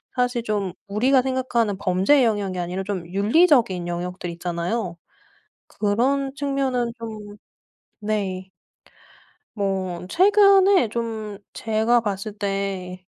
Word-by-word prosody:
사실 245 -1 0
좀 205 -5 -2
우리가 250 +7 +3
생각하는 250 -5 0
범죄의 200 +8 +3
영역이 200 -4 -1
아니라 180 +2 -3
좀 190 -3 -4
윤리적인 205 - +3
영역들이 175 0 -4
있잖아요. 175 +2 -3 0.7
그런 265 +6 0
측면은 270 -4 -1
좀 215 -2 -8 0.6
네. 195 -3 -3 1.1
뭐 190 -3 -2
최근에 395 - +5
좀 220 -2 -4 0.2
제가 225 +2 +1
봤을 205 0 -4
때 195 -2 -3
210 Hz, 225 characters per minute, -23 LUFS, 190-245 Hz, 1.1 s, 최근에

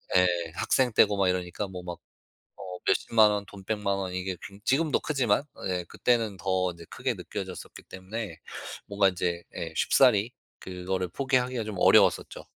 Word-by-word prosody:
예. 90 0 +6 0.3
학생 130 +6 +2
때고 105 -1 +4
막 100 -1 +3
이러니까 90 +2 -2
뭐 90 -1 -7
막 90 -1 -6 0.6
어 90 -1 -8
몇 - - +5
100,000 110 -2 +4
원 100 -1 -2
돈 100 -1 -12
1,000,000 100 -1 -1
원 95 -2 -4
이게 95 0 -3
굉 100 +1 -10
지금도 150 +5 +2
크지만 130 -6 +1 0.2
예 90 -1 -1
그때는 115 -5 0
더 95 -1 0
인제 85 -1 -12
크게 - - -2
느껴졌었기 - - -7
때문에 95 -2 -7 0.5
뭔가 100 -1 +3
인제 90 -1 -2
예 80 -1 -5
쉽사리 120 +2 +4 0.3
그거를 90 0 -3
포기하기가 130 0 0
좀 105 -1 -6
어려웠었죠. - - +4
100 Hz, 310 characters per minute, -28 LUFS, 90-110 Hz, 0.6 s, 예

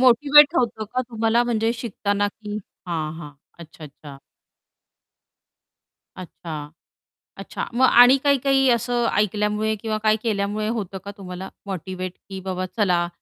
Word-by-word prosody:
Motivate 285 +5 +6
होतं 220 -3 0
का 255 - +2
तुम्हाला 225 +1 +2
म्हणजे 225 -1 0
शिकताना 205 -3 -1
की 210 0 -8 0.3
हां, 160 -3 -3
हां. 150 -2 -9 0.3
अच्छा, 160 -1 -12
अच्छा. 140 -1 -12 2.0
अच्छा, 160 -4 -8 0.7
अच्छा. - - -6
मग 260 +2 +4
आणि 245 +3 +7
काही-काही 270 -1 +3
असं 240 +1 0
ऐकल्यामुळे 210 +1 0
किंवा 215 +1 -3
काय 215 0 +4
केल्यामुळे 210 -1 -1
होतं 210 -4 -3
का 200 - -5
तुम्हाला 185 0 -7 0.2
मोटिव्हेट 185 -1 -5 0.2
की 190 - -6
बाबा 185 0 -3
चला 180 -5 +2
210 Hz, 125 wpm, -22 LUFS, 185-235 Hz, 2.0 s, आणि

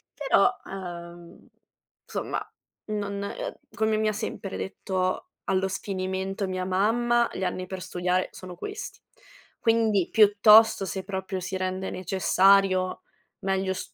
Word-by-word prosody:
Però, 265 -5 +3
uhm, 175 -2 -9 0.6
somma, - - -4 0.3
non 200 -1 -3
uhm, - - -5 0.2
come 220 0 +1
mi 215 0 +1
ha 215 - +1
sempre 205 -2 -5
detto 185 -1 -2 0.2
allo 190 0 +1
sfinimento 190 0 -3
mia 185 0 -3
mamma: 235 +5 +2
"Gli 190 - -4
anni 185 0 -2
per 190 -1 -6
studiare 180 0 -1
sono 180 -1 -9
questi." 415 - -7 0.6
Quindi 225 -5 +2
piuttosto 210 0 +6
se 190 0 -4
proprio 190 0 -4
si 190 +1 -4
rende 185 0 -2
necessario 185 0 +3 0.4
meglio 190 0 0
st - - -7
190 Hz, 125 wpm, -26 LUFS, 185-210 Hz, 0.6 s, piuttosto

